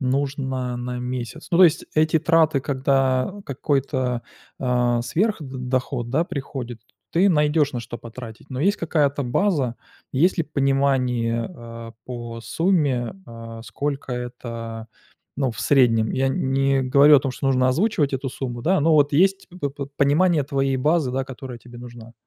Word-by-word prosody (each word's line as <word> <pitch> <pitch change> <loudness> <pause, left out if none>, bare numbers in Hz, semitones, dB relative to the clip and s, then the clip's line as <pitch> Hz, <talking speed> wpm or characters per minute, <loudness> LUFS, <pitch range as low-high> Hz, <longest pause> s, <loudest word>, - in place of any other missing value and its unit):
нужно 130 -2 -1
на 125 0 -4
месяц. 125 +4 -5
Ну, 170 - +2
то 185 - +9
есть 165 -2 +2
эти 155 +1 +3
траты, 160 -3 +3
когда 135 +1 +1
какой-то, 130 -3 -1 0.4
э, 125 -2 +1
сверх 210 - 0
д 145 - -7
доход, 125 -1 -2
да, 155 +6 +2
приходит, 130 -7 -6 0.3
ты 185 +4 +4
найдёшь 150 -2 +2
на 120 - -3
что 120 +1 -8
потратить. 115 +2 -10
Но 130 0 -4
есть 200 +6 +2
какая-то 145 -4 0
база, 135 - +1 0.4
есть 170 +8 +3
ли 165 - +1
понимание, 135 -5 +1
э, 115 -3 -9
по 120 -2 -7
сумме, 145 -6 0
э, 115 -1 -9
сколько 140 +4 -4
это, 115 -2 -6 0.5
ну, 135 -2 0
в 115 - -10
среднем. 115 -6 +3
Я 135 - +1
н 135 0 -1
не 135 0 +2
говорю 140 +3 +6
о - - +4
том, 135 -1 -3
что 135 - -4
нужно 130 -1 +3
озвучивать 150 - +1
эту 135 +1 -2
сумму, 120 -2 -5
да, 190 +3 +2
но 160 +2 +3
вот 145 -1 +4
есть 190 +5 +2
п 175 -6 -4
п 140 0 -6
понимание 150 +2 +3
твоей 135 -1 0
базы, 150 +1 +1
да, 130 +1 -1
которая 130 -1 -8
тебе 120 +1 -13
нужна? 120 -1 -11
135 Hz, 165 wpm, -23 LUFS, 120-150 Hz, 0.5 s, то